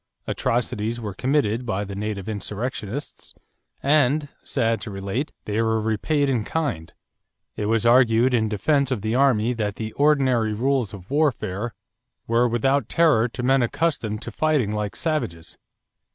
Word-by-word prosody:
Atrocities 120 Hz, -1 st, -1 dB
were 105 Hz, -4 st, -5 dB
committed 125 Hz, -1 st, 0 dB
by 105 Hz, -4 st, -2 dB
the 100 Hz, -1 st, -7 dB
native 100 Hz, -1 st, -4 dB
insurrectionists 110 Hz, +4 st, -5 dB, 0.5 s
and, 145 Hz, 0 st, +3 dB
sad 115 Hz, 0 st, 0 dB
to -, -, -6 dB
relate, 100 Hz, +9 st, -3 dB
they 105 Hz, +2 st, 0 dB
were 110 Hz, 0 st, +1 dB
repaid 115 Hz, +7 st, 0 dB
in 125 Hz, -5 st, +1 dB
kind; 115 Hz, -, -3 dB, 0.6 s
it 105 Hz, -, -2 dB
was 115 Hz, 0 st, +1 dB
argued 120 Hz, 0 st, +5 dB
in 110 Hz, -3 st, +2 dB
defense 140 Hz, +6 st, +1 dB
of 120 Hz, -7 st, -2 dB
the 110 Hz, +1 st, -1 dB
army 125 Hz, -3 st, +3 dB
that 105 Hz, -4 st, -2 dB
the 110 Hz, -1 st, -5 dB
ordinary 130 Hz, -7 st, +2 dB
rules 125 Hz, -1 st, 0 dB
of 95 Hz, +2 st, -11 dB
warfare 120 Hz, -7 st, 0 dB, 0.5 s
were 115 Hz, +2 st, +3 dB
without 135 Hz, +4 st, +1 dB
terror 155 Hz, -9 st, +4 dB
to 125 Hz, +1 st, -6 dB
men 135 Hz, +1 st, +3 dB
accustomed 120 Hz, -5 st, -1 dB
to -, -, -6 dB
fighting 150 Hz, -9 st, +1 dB
like 105 Hz, -2 st, -3 dB
savages. 120 Hz, -, -3 dB
115 Hz, 150 wpm, -23 LUFS, 105-135 Hz, 0.6 s, argued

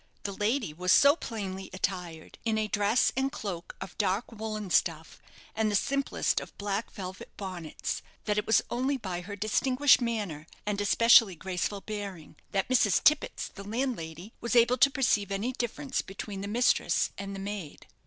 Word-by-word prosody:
The 200 Hz, -, -2 dB
lady 210 Hz, -, -1 dB
was 180 Hz, +3 st, 0 dB
so 280 Hz, +7 st, +7 dB
plainly 195 Hz, -, -5 dB
attired, 180 Hz, -4 st, -4 dB
in 225 Hz, -2 st, +1 dB
a 215 Hz, 0 st, 0 dB
dress 210 Hz, +4 st, +2 dB
and 265 Hz, +1 st, 0 dB
cloak 180 Hz, -9 st, -6 dB
of -, -, -8 dB
dark 205 Hz, +3 st, 0 dB
woollen 215 Hz, -3 st, -5 dB
stuff, 160 Hz, -2 st, 0 dB, 0.3 s
and 220 Hz, -1 st, +1 dB
the 205 Hz, -, 0 dB
simplest 275 Hz, +6 st, +1 dB
of -, -, -11 dB
black 205 Hz, +2 st, -2 dB
velvet 190 Hz, -2 st, -7 dB
bonnets, 185 Hz, -5 st, -4 dB, 0.2 s
that 210 Hz, -, +1 dB
it -, -, -5 dB
was 220 Hz, -, +4 dB
only 260 Hz, +3 st, 0 dB
by 185 Hz, -7 st, -4 dB
her 200 Hz, +3 st, -7 dB
distinguished 255 Hz, +7 st, +3 dB
manner, 205 Hz, -10 st, -3 dB, 0.2 s
and 205 Hz, -1 st, -1 dB
especially 225 Hz, -1 st, +6 dB
graceful 190 Hz, +3 st, -3 dB
bearing, 200 Hz, -8 st, -6 dB, 0.2 s
that 195 Hz, -1 st, 0 dB
Mrs. 235 Hz, -6 st, +3 dB
Tippets, 300 Hz, 0 st, +2 dB
the 200 Hz, -, -10 dB
landlady, 205 Hz, -, -4 dB
was 235 Hz, 0 st, -1 dB
able 240 Hz, +1 st, +5 dB
to 275 Hz, -, +7 dB
perceive 215 Hz, -7 st, +1 dB
any 200 Hz, +6 st, -1 dB
difference 255 Hz, +2 st, -2 dB
between 195 Hz, +1 st, -7 dB
the 200 Hz, -, -4 dB
mistress 240 Hz, +4 st, +2 dB
and 200 Hz, 0 st, -5 dB
the -, -, -6 dB
maid. 195 Hz, -6 st, -6 dB
205 Hz, 170 wpm, -29 LUFS, 190-235 Hz, 0.3 s, so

